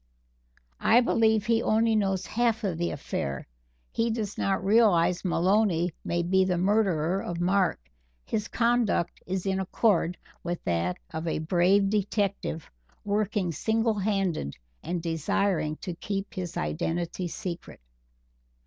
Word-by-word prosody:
_ - - -41 0.2
I 230 - +5
believe 220 -3 +2
he 230 0 +2
only 225 0 +2
knows 195 -3 0
half 235 -1 0
of 180 -5 -1
the 175 - 0
affair; 70 -1 -4 0.5
he 230 +1 0
does 220 -3 -3
not 195 -1 -1
realize 185 -5 +4
Maloney 180 -1 +2
may 170 0 -1
be 190 +2 +3
the 185 -1 0
murderer 190 -2 +2
of 175 -1 -4
Mark 185 +1 +2 0.5
his 210 0 -2
conduct 235 -7 +1
is 185 0 -2
in 190 0 0
accord 185 -2 +1 0.2
with 175 0 -4
that 85 +1 0 0.2
of 160 +1 -4
a - - 0
brave 185 +5 +3
detective 200 -5 -1 0.4
working 205 -3 0
single 220 +6 0
handed 190 - -1 0.3
and 175 -1 -3
desiring 165 0 0
to 180 - -4
keep 195 +3 -4
his 180 -3 -5
identity 165 - -2
secret." 175 +1 -6
190 Hz, 135 wpm, -27 LUFS, 170-210 Hz, 0.5 s, I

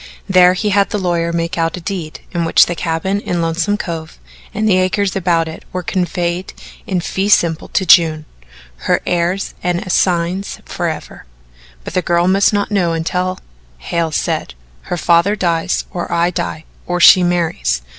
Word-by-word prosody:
There 185 -1 +5
he 210 +3 -1
had 200 0 +2
the - - -2
lawyer 170 -3 -1
make 170 +1 -2
out 165 +2 0
a - - -6
deed 175 -3 -5
in 170 -2 -1
which 165 - +5
the 175 - -3
cabin 175 +4 -2
in 175 -3 -3
Lonesome 170 +5 0
Cove 165 -5 -6 0.3
and 215 +1 -1
the 185 -3 +4
acres 190 +1 0
about 170 -3 +1
it 160 - -9
were 185 0 -4
conveyed 175 0 -2 0.3
in 185 -2 -1
fee 190 +3 -2
simple 165 -5 +2
to 190 - -1
June 160 -3 +5 0.6
her - - +3
heirs 175 +3 -1
and 175 -1 0
assigns 180 +1 0
forever; - - -5 0.6
but - - -8
the 185 - +1
girl 175 0 +1
must 195 +1 +4
not 205 0 -1
know 180 -5 +1
until, 180 +3 -2 0.4
Hale 165 - -2
said, 155 - -2 0.3
"her 180 - -1
father 170 +4 +3
dies, 170 -2 -1
or 175 - -5
I 170 +1 +1
die, 160 -2 -4 0.2
or 180 0 -1
she 180 +1 +8
marries." 170 - 0
175 Hz, 170 wpm, -16 LUFS, 170-185 Hz, 0.6 s, she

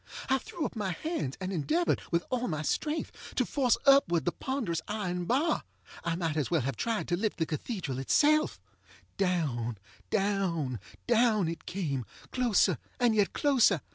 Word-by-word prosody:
I 265 - +4
threw 310 +5 -4
up - - -4
my 200 -4 -1
hands 310 - -3
and 190 0 -3
endeavored, 310 - +1
with 170 0 +1
all 250 -1 0
my 155 -3 -2
strength, 305 - -3
to - - +2
force 260 -5 +2
upward 275 - +5
the 175 - +2
ponderous 230 - -2
iron 180 -4 -2
bar. 295 - +2 0.4
I 170 -1 0
might 165 -3 -1
as 150 - 0
well 165 -4 +2
have 135 0 -2
tried 225 - -1
to 175 - +2
lift 210 +3 -1
the 160 - +1
cathedral 155 - -3
itself. 305 - +3 0.6
Down, 145 - 0 0.3
down, 185 - 0 0.3
down 225 -5 +3
it 165 0 -5
came, 150 -9 -2 0.3
closer 215 - +3 0.2
and 240 -2 +4
yet 205 -2 +2
closer. 250 - +4
195 Hz, 165 wpm, -30 LUFS, 165-245 Hz, 0.6 s, upward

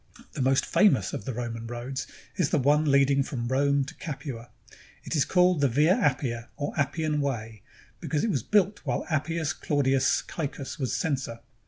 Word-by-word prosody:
The - - -4
most 135 +1 +3
famous 135 - +3
of 100 - -5
the 130 - -3
Roman 115 -1 -4
roads 120 +3 -5 0.3
is 180 -8 +1
the - - +2
one 145 +3 +3
lead 140 0 +4
ing 140 0 +3
from 125 -3 -3
Rome 140 +2 +2
to 135 - -8
Capua. 135 -6 -7 0.5
It - - -3
is 145 - +3
called 180 -3 +3
the 140 - +5
Via 150 +8 +4
Appia 120 -4 0
or 145 -1 -3
Appian 150 +1 0
Way, 115 -6 -3 0.4
because 150 -2 -1
it 225 - +1
was 135 - 0
built 205 - +2
while - - -2
Appius 160 +1 0
Claudius 135 -2 +1
Caecus 140 -4 -5
was 130 -3 -1
censor. 135 -8 -2
140 Hz, 180 wpm, -27 LUFS, 130-155 Hz, 0.5 s, the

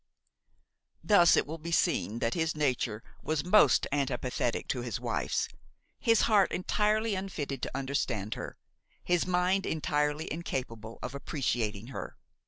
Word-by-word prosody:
Thus 175 -5 +6
it - - +3
will 160 +3 -6
be 170 +2 -6
seen 115 - +1
that 115 0 0
his 160 -2 0
nature 125 -7 -1 0.2
was 155 -1 -1
most 210 +4 +5
antipathetic 130 -3 -1
to 125 - -1
his 120 -3 -3
wife's, - - -1 0.5
his 230 -1 +4
heart 205 -4 +4
entirely 210 +4 +1
unfitted 155 -9 -4
to 130 - -3
understand 130 -6 -2
her, - - -7 0.5
his 175 0 +1
mind 185 +2 +1
entirely 150 0 0
incapable 115 -9 -5
of 125 - -4
appreciating 120 -6 -2
her. - - -7
150 Hz, 135 wpm, -30 LUFS, 125-180 Hz, 0.5 s, Thus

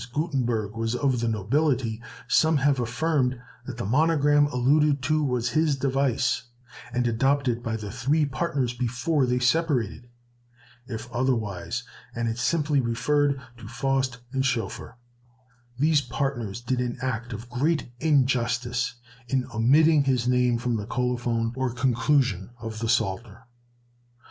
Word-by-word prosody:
As 120 - -7
Gutenberg 120 - -1
was 115 +1 -1
of 130 -2 +1
the 115 - -1
nobility, 115 +1 0 0.3
some 160 -1 +4
have 140 -1 +2
affirmed 125 +1 0 0.3
that 125 -3 -6
the 120 - -3
monogram 145 +3 +3
alluded 140 +2 +2
to 155 +1 +1
was 125 -3 0
his 155 +3 +2
device, 135 -2 +1 0.5
and 125 0 0
adopted 125 +1 +1
by 115 -2 -3
the 105 -2 -6
three 140 +7 +1
partners 135 -3 -1
before 125 +4 0
they 125 0 +1
separated; 125 -4 0 0.8
if 110 -1 -6
otherwise, 115 -5 -1 0.3
and 115 0 -1
it 115 +1 -3
simply 150 +2 +1
referred 140 +4 +1 0.2
to 115 -2 -10
Faust 130 +1 -1
and 135 -1 0
Schoeffer, 120 -1 -3 0.8
these 150 +2 +3
partners 120 -4 -3
did 125 +1 -1
an 125 0 -2
act 120 -2 -3
of 110 +2 -7
great 140 +4 0
injustice 125 -4 +1 0.3
in 130 0 0
omitting 145 +6 +4
his 125 -3 +1
name 125 -1 +3
from 120 0 -1
the 105 0 -5
colophon 120 -2 -1
or 130 -1 -1
conclusion 125 -4 +1
of 115 -1 -6
the 115 0 -2
Psalter. 105 +2 -1
125 Hz, 140 wpm, -26 LUFS, 115-140 Hz, 0.8 s, some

